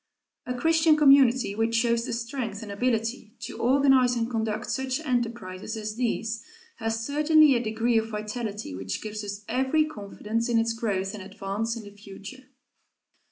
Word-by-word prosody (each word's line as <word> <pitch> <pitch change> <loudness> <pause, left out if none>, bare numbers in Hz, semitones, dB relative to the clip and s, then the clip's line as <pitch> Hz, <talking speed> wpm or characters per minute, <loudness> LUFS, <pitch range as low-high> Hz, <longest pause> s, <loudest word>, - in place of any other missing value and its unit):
A 250 - -2
Christian 320 +3 +4
community 270 -6 +5
which 225 +2 0
shows 235 0 +2
the - - -3
strength 230 -2 -4
and 205 - -7
ability 225 +1 -1
to - - -7
organize 260 -1 +4
and 230 -1 0
conduct 220 -1 -2
such 265 0 -1
enterprises 230 -7 -3
as 215 -1 -4
these 230 -2 -2 0.3
has 225 -1 -2
certainly 300 0 +5
a 240 - +1
degree 225 +1 +1
of 225 0 -4
vitality 210 - -4
which 95 +1 -5
gives 215 0 -5
us 205 0 -6
every 265 +6 +2
confidence 225 -2 -4
in 235 - +3
its 230 0 +1
growth 200 -4 -2
and 210 - -7
advance 200 +4 -3
in 225 - -8
the 205 - -11
future. 205 +5 -11
230 Hz, 160 wpm, -26 LUFS, 210-255 Hz, 0.3 s, community